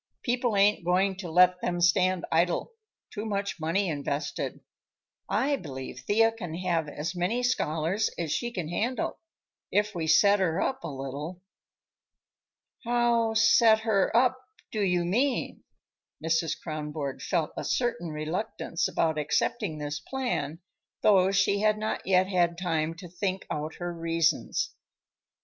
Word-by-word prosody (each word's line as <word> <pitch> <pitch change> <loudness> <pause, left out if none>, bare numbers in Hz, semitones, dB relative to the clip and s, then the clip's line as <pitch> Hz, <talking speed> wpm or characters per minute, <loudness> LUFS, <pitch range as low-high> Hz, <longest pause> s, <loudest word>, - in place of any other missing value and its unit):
People 245 -2 0
ain't 200 -1 +4
going 185 +3 +2
to 185 -3 -6
let 180 +2 +5
them 175 0 -1
stand 180 +1 +3
idle; 170 - +1 0.4
too 210 - -4
much 200 -4 -3
money 170 +5 0
invested. 145 -1 -3 0.7
I 280 +1 +1
believe 130 - -7
Thea 220 - +3
can 180 -8 -6
have 170 -3 -1
as 150 +4 -4
many 195 +8 0
scholars 180 -4 0
as 165 -3 -2
she 240 +7 -1
can 180 -8 -4
handle, 235 +8 -2 0.5
if 210 +1 +1
we 165 -3 -3
set 200 +6 +5
her 180 -2 +1
up 265 +5 -1
a - - -3
little." 145 +6 -6 1.4
"How 235 -2 +2
set 225 0 +5
her 215 -4 +2
up, 255 +1 +2 0.3
do 215 - -2
you 180 -3 +1
mean?" 245 +9 0 0.6
Mrs. 160 -1 0
Kronborg 150 -3 -5
felt 165 -5 -1
a - - -4
certain 205 -10 -1
reluctance 165 +3 -2
about 160 -2 0
accepting 155 +4 -1
this 145 0 -4
plan, 165 - -3 0.4
though 190 -3 +5
she 200 +1 +2
had 215 0 +3
not 215 -2 -3
yet 185 -1 +4
had 175 -3 +1
time 165 -2 -1
to 180 +2 -10
think 185 +2 -3
out 155 +1 -3
her 175 0 -4
reasons. 165 -1 0
180 Hz, 140 wpm, -28 LUFS, 160-215 Hz, 1.4 s, let